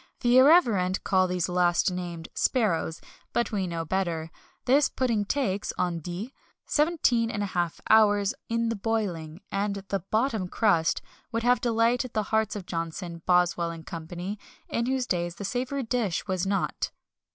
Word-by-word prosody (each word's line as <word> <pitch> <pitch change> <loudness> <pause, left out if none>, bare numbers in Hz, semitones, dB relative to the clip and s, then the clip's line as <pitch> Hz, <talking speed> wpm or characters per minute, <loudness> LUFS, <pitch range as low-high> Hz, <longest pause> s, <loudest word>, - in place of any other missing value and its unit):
The 245 0 +5
irreverent 235 - +4
call 185 -1 +3
these 180 -1 -1
last 180 0 +2
named 175 -2 -5
sparrows, 175 -9 0 0.3
but 235 - 0
we 195 -4 -1
know 165 -1 -3
better. 165 -3 -2 0.3
This 275 +3 +4
pudding 230 -5 0
takes 205 -5 -1
(on 175 -2 0
dit) 180 - -6 0.4
17½ 230 - +1
hours 205 -1 +5 0.2
in 230 0 0
the 230 - -1
boiling, 195 -7 -2
and 200 0 -1
the 195 - 0
"bottom 215 +1 0
crust" 180 -5 +2 0.3
would 230 0 -1
have 245 +1 +3
delighted 235 +1 +1
the 215 - +1
hearts 220 -1 +2
of 200 -3 -6
Johnson, 170 0 -5
Boswell, 175 -1 +3
and 165 -1 -8
Co., 195 -3 -5 0.7
in 235 +1 -1
whose 260 -1 0
days 175 -4 -1
the 200 - -6
savoury 255 +5 -2
dish 225 -6 -1
was 190 -2 -1
not. 195 0 -1
200 Hz, 150 wpm, -27 LUFS, 175-230 Hz, 0.7 s, The